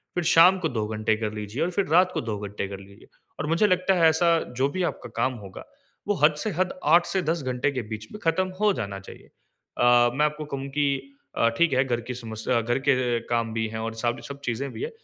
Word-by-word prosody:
फिर 175 - 0
शाम 180 +3 +7
को 160 - -1
2 110 -5 -2
घंटे 110 0 0
कर 110 -1 -3
लीजिए 105 +3 -3
और 180 - -1
फिर 195 +2 0
रात 185 +2 +5
को - - -1
2 110 -3 -3
घंटे 100 -1 -4
कर 100 -1 -7
लीजिए। 100 0 -16 0.3
और 150 - -2
मुझे 170 +6 +3
लगता 185 0 +2
है 165 -2 +5
ऐसा 165 +1 +3 0.2
जो 135 +2 +2
भी 185 +5 -2
आपका - - -3
काम 130 - +1
होगा, 95 - -10 0.4
वो 205 - +2
हद 150 - +6
से 215 - -2
हद 185 +1 -1
8 170 +4 +5
से 190 - -1
10 165 +1 -1
घंटे 130 +2 0
के 130 - -3
बीच 110 -1 -5
में 210 - -8
ख़त्म 185 +3 +1
हो 210 -1 +5
जाना 100 - -4
चाहिए। 95 - -13 0.5
अ, 120 0 +5
मैं 150 +2 +3
आपको 150 0 -3
कहूँ 140 -1 -5
कि 145 - +3 0.5
अ, 115 - +4
ठीक 170 -3 +3
है 130 - +3
घर 120 -2 -1
की - - -1
समस्या 115 0 -2
घर 120 +3 0
के 125 -3 +2
काम 115 -1 -1
भी 115 0 -1
है 110 0 -5
और 115 0 -3
साथ 120 0 +1
में 120 - -11
सब 140 +3 -8
चीज़ें 125 +3 -2
भी - - -7
हैं, 450 - -2
130 Hz, 250 wpm, -25 LUFS, 115-165 Hz, 0.5 s, शाम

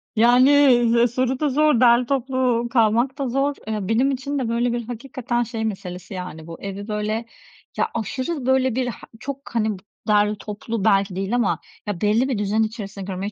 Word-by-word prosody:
Yani, 240 0 +5
soru 255 +2 -1
da 300 -2 +1
zor, 300 -2 +3
derli 240 0 +5
toplu 255 -2 0
kalmak 235 +3 +2
da 275 -4 -2
zor. 275 +3 0
Eee, 210 -3 -3
benim 245 +6 +2
için 275 +2 -3
de 240 - -2
böyle 235 +1 +1
bir 240 -2 -4
hakikaten 245 0 -3
şey 225 -1 -4
meselesi 185 -2 -6
yani 175 -3 -7
bu 165 - -9
evi 200 +1 -6
böyle 215 +1 -2 0.5
ya - - +2
aşırı 255 - -3
böyle 260 -2 +2
bir, 255 -1 0 0.3
çok, 275 +2 -5 0.2
hani, 215 -3 +1 0.3
dar 210 0 +3
toplu 210 +1 -5
belki 195 -3 +3
değil 195 +5 -1
ama 235 -5 +1 0.3
ya 205 -5 -3
belli 220 +5 +2
bir 255 - 0
düzen 210 +2 +1
içerisinde 210 -3 -5
görmeyi 195 +1 -4
235 Hz, 175 wpm, -22 LUFS, 210-255 Hz, 0.5 s, Yani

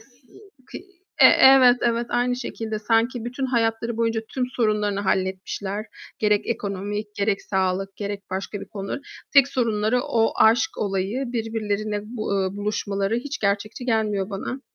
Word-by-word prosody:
s 225 - -20 0.6
k - - -8 0.4
e - - +9
evet, 260 -2 +7
evet, 235 0 0
aynı 245 +1 +1
şekilde. 225 -3 -4
Sanki 225 +2 +1
bütün 255 +2 -3
hayatları 230 -1 0
boyunca 230 -1 0
tüm 255 -2 -2
sorunlarını 210 -3 +1
halletmişler, 190 +2 -2 0.3
gerek 210 -1 +2
ekonomik, 205 -1 -3
gerek 200 0 0
sağlık, 190 0 -1
gerek 200 0 -6
başka 195 +2 -4
bir - - -8
konu. 195 +5 -5 0.3
Tek 280 -2 +6
sorunları 230 -2 +1
o 225 -1 +1
aşk 240 +9 +3
olayı, 200 +6 -1
birbirlerine 215 -2 -2
bu 220 -2 -4
eee, 190 +1 -3
buluşmaları 205 0 -1
hiç 280 +4 -4
gerçekçi 210 +4 -1
gelmiyor 215 -4 0
bana. 225 +7 -5
215 Hz, 140 wpm, -23 LUFS, 200-235 Hz, 0.6 s, e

